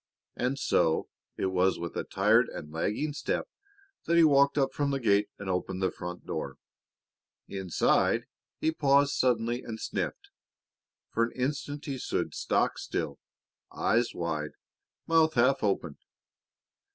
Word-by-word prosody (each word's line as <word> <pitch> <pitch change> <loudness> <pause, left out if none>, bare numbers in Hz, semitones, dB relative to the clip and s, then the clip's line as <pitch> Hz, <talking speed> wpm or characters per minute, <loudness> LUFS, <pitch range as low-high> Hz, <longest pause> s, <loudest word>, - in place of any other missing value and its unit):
And 125 +3 -1
so 80 -10 +1 0.3
it 95 - 0
was 95 0 +2
with 85 0 -6
a - - -1
tired - - +3
and 75 - -8
lagging 105 - -1
step 145 - -2 0.6
that 170 - +2
he 170 - +7
walked 140 -2 +5
up 135 -2 +2
from 145 -1 0
the 140 -1 0
gate 105 -3 +2
and 100 - -8
opened 95 0 -2
the 95 -1 +1
front 90 0 -7
door. - - -4 0.9
Inside, 95 -4 +1 0.3
he 160 - +1
paused 140 -2 +3
suddenly 120 -1 +1
and 110 -1 -7
sniffed. - - -4 0.8
For 115 - +2
an 115 - -8
instant 145 +3 -3
he 140 -4 -4
stood - - -2
stock - - 0
still, - - -3 0.5
eyes 115 +4 +1
wide, 80 -3 -3 0.5
mouth 160 -1 +3
half 130 +3 +3
open. 90 -7 -1
120 Hz, 140 wpm, -29 LUFS, 95-140 Hz, 0.9 s, he